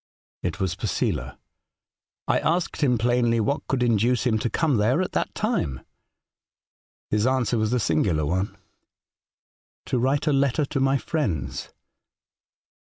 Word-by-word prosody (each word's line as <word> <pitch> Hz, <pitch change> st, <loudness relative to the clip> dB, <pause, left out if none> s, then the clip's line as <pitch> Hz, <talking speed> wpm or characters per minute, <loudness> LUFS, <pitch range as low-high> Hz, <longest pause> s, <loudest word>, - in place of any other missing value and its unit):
It -, -, -3 dB
was 95 Hz, -2 st, 0 dB
Posela. 90 Hz, -, -2 dB, 0.9 s
I -, -, +3 dB
asked 170 Hz, 0 st, -1 dB
him 125 Hz, -5 st, +3 dB
plainly 120 Hz, 0 st, +2 dB
what 115 Hz, +7 st, -1 dB
could 130 Hz, -2 st, 0 dB
induce 120 Hz, +1 st, +2 dB
him 110 Hz, -3 st, +2 dB
to 120 Hz, -, -1 dB
come 150 Hz, -3 st, +1 dB
there 115 Hz, +9 st, +2 dB
at 185 Hz, -, -1 dB
that -, -, -2 dB
time. 205 Hz, -, -1 dB, 1.3 s
His 105 Hz, +3 st, +2 dB
answer 130 Hz, -3 st, +1 dB
was 110 Hz, 0 st, 0 dB
a 125 Hz, -, +2 dB
singular 80 Hz, -4 st, +1 dB
one. 95 Hz, +5 st, -1 dB, 0.6 s
' -, -, -76 dB
To 125 Hz, -, 0 dB
write 135 Hz, +4 st, +1 dB
a 150 Hz, -, +2 dB
letter 140 Hz, +2 st, +2 dB
to 135 Hz, 0 st, -3 dB
my 135 Hz, +1 st, +3 dB
friends.' 80 Hz, -, -3 dB
120 Hz, 145 wpm, -25 LUFS, 100-135 Hz, 1.3 s, I